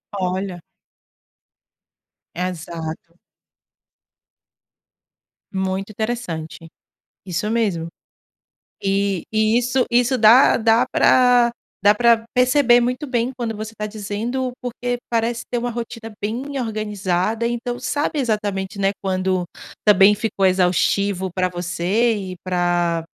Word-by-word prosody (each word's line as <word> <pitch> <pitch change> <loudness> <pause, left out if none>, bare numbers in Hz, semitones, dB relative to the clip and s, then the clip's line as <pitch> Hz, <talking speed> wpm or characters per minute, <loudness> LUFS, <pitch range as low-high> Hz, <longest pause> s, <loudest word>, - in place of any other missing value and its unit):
Olha. 185 -1 -2 1.8
Exato. 170 -1 -5 2.4
Muito 190 +1 -2
interessante. 195 -8 -4 0.6
Isso 185 +3 -2
mesmo. 200 -8 0 0.9
E 195 -2 0
e 220 +2 +3
isso 250 +1 +1
isso 245 +2 +3
dá 230 +4 +7
dá 230 +2 +3
pra 245 -2 +4 0.3
dá 205 +1 +6
pra 230 0 +3
perceber 250 -1 +4
muito 250 +4 -1
bem 245 -1 0
quando 230 -2 -3
você 220 +1 -6
tá 210 - -3
dizendo, 225 +5 -3
porque 245 0 -3
parece 230 0 -1
ter 245 - 0
uma 240 +1 -2
rotina 230 -1 -6
bem 255 +7 -3
organizada, 215 -1 -1
então, 240 +1 -3
sabe 295 +1 -2
exatamente, 210 -5 -2
né, 195 -1 +1
quando 185 -2 -1 0.4
também 200 0 +7
ficou 205 -2 -1
exaustivo 185 +1 +1
pra 185 0 0
você 180 +6 0 0.2
e - - -8
pra 175 -2 0
215 Hz, 105 wpm, -21 LUFS, 185-240 Hz, 2.4 s, dá